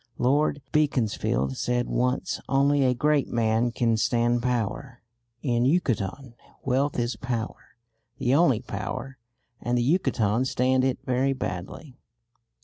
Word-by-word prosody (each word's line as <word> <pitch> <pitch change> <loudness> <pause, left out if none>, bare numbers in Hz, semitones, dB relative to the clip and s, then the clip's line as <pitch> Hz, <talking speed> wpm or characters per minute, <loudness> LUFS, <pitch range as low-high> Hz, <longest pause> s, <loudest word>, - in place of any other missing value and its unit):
Lord 145 +2 +1
Beaconsfield 110 - 0
said 120 0 0
once, 125 +1 -1
"Only 140 +1 +3
a 125 -1 +2
great 145 +1 +2
man 115 +1 +1
can 115 -1 +1
stand 120 +1 +1
power." 125 +1 -3 0.4
In 120 -3 +1
Yucatan 130 - 0 0.3
wealth 135 +2 0
is 120 0 -1
power, 120 -4 -5 0.4
the 130 -1 +1
only 140 -7 +4
power, 115 +5 -5 0.4
and 120 +1 0
the 120 - +2
Yucatecans 125 - +1
stand 130 +1 +2
it 130 -1 +1
very 130 +2 +1
badly. 125 - -6
125 Hz, 125 wpm, -26 LUFS, 120-135 Hz, 0.4 s, only